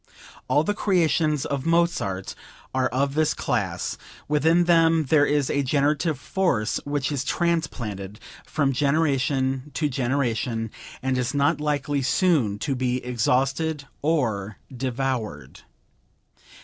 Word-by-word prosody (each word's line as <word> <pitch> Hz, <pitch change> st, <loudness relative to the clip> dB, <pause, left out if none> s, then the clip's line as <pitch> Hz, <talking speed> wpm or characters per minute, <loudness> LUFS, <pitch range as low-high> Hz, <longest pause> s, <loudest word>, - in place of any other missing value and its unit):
All 145 Hz, -, +3 dB
the 205 Hz, -, 0 dB
creations 165 Hz, -7 st, +1 dB
of 140 Hz, -2 st, -2 dB
Mozart 165 Hz, -, 0 dB, 0.4 s
are 130 Hz, 0 st, +2 dB
of 140 Hz, +2 st, 0 dB
this 155 Hz, 0 st, +1 dB
class; 95 Hz, -9 st, -2 dB, 0.3 s
within 160 Hz, +4 st, +3 dB
them 165 Hz, -2 st, +4 dB
there 145 Hz, -2 st, +5 dB
is 145 Hz, -2 st, +1 dB
a 140 Hz, -, +1 dB
generative 145 Hz, +3 st, +1 dB
force 130 Hz, -, 0 dB
which 145 Hz, -1 st, -1 dB
is 140 Hz, -3 st, -1 dB
transplanted 120 Hz, -, -2 dB, 0.2 s
from 140 Hz, -3 st, 0 dB
generation 135 Hz, -1 st, +1 dB
to 150 Hz, -2 st, 0 dB
generation, 120 Hz, -4 st, -1 dB, 0.3 s
and 130 Hz, -1 st, 0 dB
is 125 Hz, +2 st, -2 dB
not 145 Hz, +1 st, +2 dB
likely 145 Hz, -1 st, 0 dB
soon 130 Hz, -, +2 dB
to 135 Hz, +7 st, -2 dB
be 125 Hz, -1 st, -1 dB
exhausted 135 Hz, +5 st, 0 dB, 0.2 s
or 110 Hz, -10 st, 0 dB, 0.2 s
devoured." 125 Hz, -, -3 dB
140 Hz, 120 wpm, -24 LUFS, 125-155 Hz, 0.4 s, there